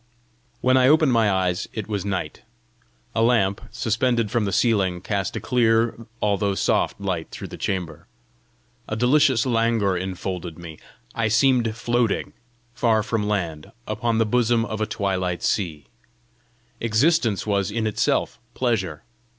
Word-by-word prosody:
When 130 +1 +4
I 130 0 +5
opened 155 -2 +4
my 115 -3 +3
eyes, 95 0 0
it 110 -3 -5
was 105 -4 -2
night. 95 -6 -4 0.7
A 115 - 0
lamp, 115 -5 +2
suspended 115 -1 0
from 115 -3 +1
the 100 - -1
ceiling, 95 -4 +1
cast 100 +1 -2
a - - -2
clear, 115 -2 +1 0.2
although 100 -1 +1
soft - - 0
light 95 -5 -3
through - - -8
the - - -8
chamber. 85 -5 -4 0.8
A 110 - -2
delicious 130 +1 +3
languor 115 -5 +1
infolded 90 -2 -4
me. 85 -3 -10 0.3
I 115 -1 0
seemed 115 0 +2
floating, 120 -1 0 0.4
far 110 -3 +2
from 110 -1 -1
land, 85 -7 -3 0.2
upon 115 +1 -1
the 115 - +3
bosom 115 0 +2
of 110 0 -5
a 110 - 0
twilight 95 -4 -2
sea. 80 -8 -1 0.9
Existence 115 - +2
was 100 -2 0
in 110 +1 -2
itself 110 - 0 0.2
pleasure. 95 - -1
110 Hz, 140 wpm, -23 LUFS, 95-115 Hz, 0.9 s, I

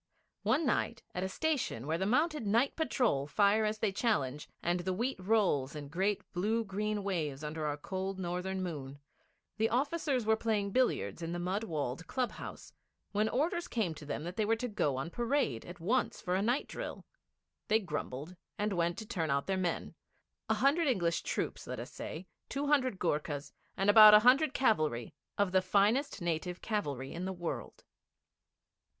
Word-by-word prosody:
One 320 - +2
night 235 -2 0
at 180 - -3
a 190 - -1
station 270 - -1
where 160 +3 -1
the 190 - 0
mounted 295 +1 +1
Night 230 +7 +2
Patrol 240 - +1
fire 205 +5 +3
as 215 0 0
they 215 -2 0
challenge, 150 - 0
and 175 +1 +1
the 185 +1 -2
wheat 240 +2 -1
rolls 185 -9 +1
in 145 -2 -6
great 190 +6 0
blue 215 +6 +1
green 210 +1 -2
waves 155 -7 -2
under 155 0 -3
our 145 0 -2
cold 190 +5 -4
northern 185 +1 -2
moon, 140 -6 -5 0.6
the 220 +1 +2
officers 275 -1 0
were 220 0 +4
playing 215 -3 0
billiards 255 -6 +1
in 165 +1 -3
the - - -2
mud 185 +5 -1
walled 155 - -3
club 255 -2 -1
house, - - -9 0.4
when 210 +1 +1
orders 340 +6 0
came 210 -8 -1
to 155 - -11
them 150 - -3
that 175 +4 -6
they 220 - +2
were 225 +2 +2
to 245 +2 -3
go 200 - 0
on 135 +6 -4
parade 235 - 0
at 175 0 -9
once 230 +9 0
for 180 -3 -2
a 190 - +2
night 240 +6 +1
drill. - - -6 0.6
They 220 0 +4
grumbled, 170 - -5 0.2
and 210 0 0
went 170 -1 0
to 220 - -6
turn 165 -6 -2
out 140 0 +1
their 195 - 0
men 180 -2 -2 0.6
a - - +3
hundred 300 +4 +3
English 175 -10 +1
troops, - - -3
let - - -4
us - - -7
say, 170 +4 -6 0.2
two 280 +1 -2
hundred 260 -7 +2
Goorkhas, 150 -4 -2 0.3
and 195 - +1
about 210 0 +10
a 210 - +8
hundred 265 +5 +5
cavalry 155 - +1 0.2
of 200 -2 +2
the 185 0 +4
finest 205 +5 +2
native 175 +1 -2
cavalry 145 - -3
in 175 +2 -4
the 190 - -2
world. 175 -2 -5
195 Hz, 185 wpm, -32 LUFS, 165-225 Hz, 0.6 s, about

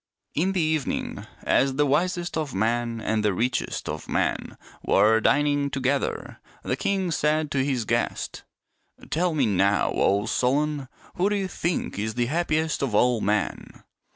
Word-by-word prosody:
In 185 +6 +1
the 185 - +1
evening 155 -3 -2 0.2
as 135 -1 +2
the 145 +1 +3
wisest 175 +5 0
of 155 -7 -3
men 115 +3 0
and 110 -1 -1
the 105 -3 +1
richest 120 +4 -1
of - - -5
men - - -1 0.3
were 110 +3 +4
dining 145 +2 +2
together, 135 +1 -2 0.2
the - - -1
king 190 -3 -1
said 155 0 +1
to 135 -3 +1
his 130 -5 -1
guest, - - -2 0.3
" - - -21
Tell 170 0 +1
me 140 -4 +3
now, 100 -1 +2
O 100 +1 +2
Solon, 140 +4 0 0.3
who 190 +3 +2
do 210 - 0
you 195 -2 -1
think 170 - -2
is 110 +1 -2
the 120 0 +1
happiest 160 +2 0
of 130 -7 -1
all 120 0 +3
men 105 0 -2
140 Hz, 160 wpm, -25 LUFS, 115-155 Hz, 0.3 s, were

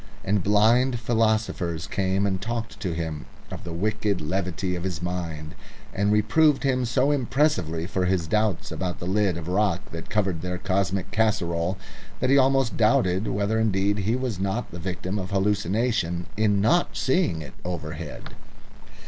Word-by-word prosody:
And 100 0 +1
blind 115 +5 +4
philosophers 110 -8 0
came 95 +3 0
and 95 -2 -1
talked 115 +1 -4
to 90 -4 -2
him 80 -2 -4 0.2
of - - -7
the 85 - -6
wicked 105 +2 -1
levity 90 +2 -2
of 85 - -4
his 90 -4 -3
mind, 85 -3 -4 0.4
and 100 +1 +1
reproved 135 +9 +3
him 130 -2 +1
so 130 +4 +2
impressively 125 - +1
for 95 -1 -1
his 90 -2 +1
doubts 105 +1 0
about 90 -1 -3
the - - -6
lid 95 -1 +1
of 85 -1 -6
rock 100 0 0
that 85 0 -7
covered 95 -6 0
their 90 +1 -3
cosmic 95 +1 -1
casserole 95 -5 0 0.4
that 130 +1 +1
he 140 - +6
almost 135 -2 +2
doubted 100 -3 +3
whether 100 +3 0
indeed 100 -1 +1
he 105 +4 +1
was 125 -7 -2
not 100 +5 -2
the 85 - -7
victim 95 +3 -3
of 95 -1 -5
hallucination 100 -2 0
in 105 -1 +2
not 145 - +2
seeing 155 - +1
it 70 - -11
overhead. 80 -3 -6
100 Hz, 160 wpm, -25 LUFS, 90-110 Hz, 0.4 s, he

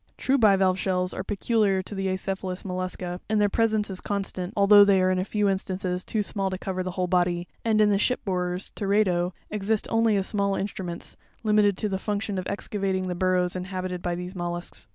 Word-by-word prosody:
True 270 +1 +1
bivalve 195 -4 +4
shells 180 -1 0
are - - -4
peculiar 200 -1 +1
to 205 - -7
the 195 -1 -2
acephalous 190 0 -3
mollusca; 180 -1 -4
and 215 -1 +2
their 205 0 +3
presence 220 -1 +1
is 185 - -3
constant, 195 -2 -3
although 205 +1 +8
they 200 -1 +4
are 185 0 +3
in 185 - +1
a - - +1
few 210 +1 0
instances 185 -1 -2
too 215 -2 -1
small 195 -1 -2
to 185 - -3
cover 185 0 -3
the 185 - -3
whole 185 - +1
body, 175 -1 +1 0.2
and 220 -2 +2
in 210 -1 +5
the 200 - +2
ship 250 +4 0
borers 180 -1 -2
(Teredo) 190 -3 +1 0.2
exist 210 +1 0
only 225 -1 +3
as 195 - +1
small 200 -1 0
instruments, 185 -4 -5 0.3
limited 210 -3 +3
to 215 - -1
the 190 -2 -2
function 205 -1 -2
of 180 - -5
excavating 195 -2 -2
the - - -1
burrows 180 0 +1
inhabited 185 -1 -4
by 175 -1 -2
these 180 +1 -6
mollusks. 175 - -6
190 Hz, 205 wpm, -26 LUFS, 180-205 Hz, 0.3 s, although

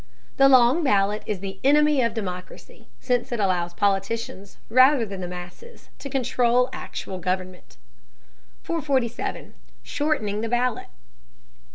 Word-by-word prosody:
The 275 0 +6
long 260 +5 +5
ballot 205 -4 +2
is 200 -4 -3
the 195 -1 -6
enemy 295 0 +4
of 230 -2 0
democracy, 180 -4 -7
since 245 -1 -1
it 240 - -2
allows 175 -3 0
politicians, 200 0 -2
rather 255 +1 +5
than 195 -2 -7
the 180 - -4
masses, 180 - -11
to 275 - -7
control 250 -1 +1
actual 190 -1 -6
government. 185 0 -4 0.9
447. 270 -8 -2 0.3
SHORTENING 220 -9 -1
THE 225 - -3
BALLOT. 245 0 -1
230 Hz, 125 wpm, -24 LUFS, 195-260 Hz, 0.9 s, The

